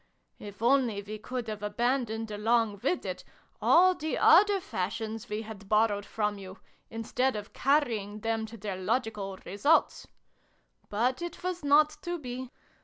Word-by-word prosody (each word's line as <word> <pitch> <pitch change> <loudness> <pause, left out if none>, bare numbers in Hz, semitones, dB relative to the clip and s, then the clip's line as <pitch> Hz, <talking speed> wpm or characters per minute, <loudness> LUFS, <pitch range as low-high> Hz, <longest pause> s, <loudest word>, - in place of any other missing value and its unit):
If 205 +2 -9
only 240 -5 +2
we 215 +1 -7
could 245 +1 -5
have 215 -1 -4
aban 240 +5 0
doned, 220 0 -5
along 220 -1 +1
with 350 +8 0
it, - - -5 0.4
all 370 +2 +6
the 315 -3 -3
other 400 +4 +6
fashions 225 - -4
we 210 +1 -3
had 205 -3 -10
borrowed 210 -1 +2
from 210 -2 -2
you, 190 0 -10 0.3
instead 240 +3 -1
of 210 0 -7
carrying 225 -8 0
them 225 0 -1
to 230 +1 -10
their 200 -2 -5
logical 205 -1 -2
results! 280 - +2 0.8
But 245 +8 0
it 345 0 -6
was 360 -2 -3
not 300 +2 +4
to 350 0 -3
be. 255 -3 -6
225 Hz, 155 wpm, -29 LUFS, 210-265 Hz, 0.8 s, all